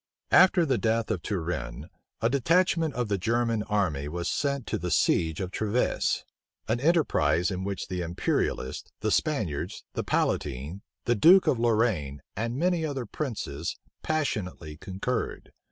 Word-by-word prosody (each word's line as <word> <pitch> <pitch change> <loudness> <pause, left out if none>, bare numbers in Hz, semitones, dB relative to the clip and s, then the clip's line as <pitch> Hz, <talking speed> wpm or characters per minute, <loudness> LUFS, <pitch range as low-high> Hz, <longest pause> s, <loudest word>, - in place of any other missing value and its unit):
After 185 -2 +6
the 130 -5 +1
death 115 0 +1
of - - -1
Turenne, 80 - -3 0.3
a 115 - +3
detachment 165 +3 +2
of 125 -2 -1
the 100 -2 0
German 115 +2 +1
army 95 -10 0
was 85 +3 -3
sent 140 -3 -1
to - - -2
the 90 +1 -3
siege 80 -1 +2
of 95 -1 -3
Treves; 110 +5 0 0.4
an 115 +2 +1
enterprise 100 - +2
in 95 0 -3
which 100 0 -3
the 90 -2 -3
imperialists, 80 -6 -2
the - - 0
Spaniards, 105 - -1
the - - -2
palatine, 75 +7 -1 0.2
the 120 - +3
duke 175 - +7
of 120 - +2
Lorraine, 105 - +1
and 115 +4 -2
many 175 +1 +1
other 140 -5 -2
princes, 95 - -4 0.3
passionately 105 - -2
concurred. 95 +9 -4
105 Hz, 145 wpm, -27 LUFS, 85-135 Hz, 0.4 s, duke